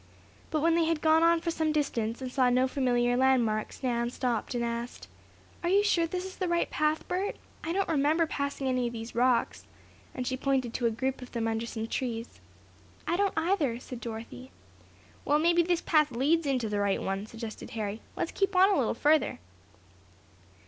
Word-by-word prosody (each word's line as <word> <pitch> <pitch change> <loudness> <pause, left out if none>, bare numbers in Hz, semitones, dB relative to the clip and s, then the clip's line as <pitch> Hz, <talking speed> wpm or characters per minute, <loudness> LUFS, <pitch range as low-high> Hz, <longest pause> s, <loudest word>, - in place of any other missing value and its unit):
But 310 - 0
when 330 +1 +3
they 335 0 +3
had 325 -1 0
gone 315 +1 +4
on 335 0 +4
for 335 - -1
some 315 -1 0
distance, 245 -6 -1
and 255 - -4
saw 255 -1 +3
no 255 +1 +3
familiar 245 -2 +1
landmarks, 245 -4 +1
Nan 235 -2 0
stopped 245 -1 -2
and 235 0 0
asked: 235 +1 -5 0.5
"Are 345 - -1
you 400 +2 +4
sure 345 -5 +2
this 365 +2 -4
is 380 - -9
the 370 - -1
right 345 0 +1
path, 305 +1 0
Bert? 375 +3 -1 0.3
I 325 - -2
don't 390 +2 0
remember 315 +1 +2
passing 280 -3 -3
any 255 -1 +1
of 235 - -5
these 225 0 -7
rocks," 245 0 +1 0.5
and 255 - -3
she 260 - -1
pointed 260 -3 0
to 240 - +1
a - - +3
group 260 +4 -2
of 250 - -10
them 230 -2 -1
under 225 +1 -2
some 225 -1 -4
trees. 230 -1 -4 0.6
"I 335 - 0
don't, 395 -1 0
either," 320 -8 +1
said 250 -1 -9
Dorothy. 230 +3 -7 0.7
"Well, 295 - +3
maybe 340 +2 +4
this 345 0 +1
path 305 -3 +3
leads 290 +6 +1
into 255 -5 0
the 205 -1 -1
right 200 -1 +1
one," 195 +2 -3
suggested 225 -1 -8
Harry. 215 0 -3
"Let's - - -2
keep 390 -1 0
on 380 +2 +6
a 390 - +2
little 240 - 0
farther." 300 +4 +2
265 Hz, 195 wpm, -29 LUFS, 235-330 Hz, 0.7 s, on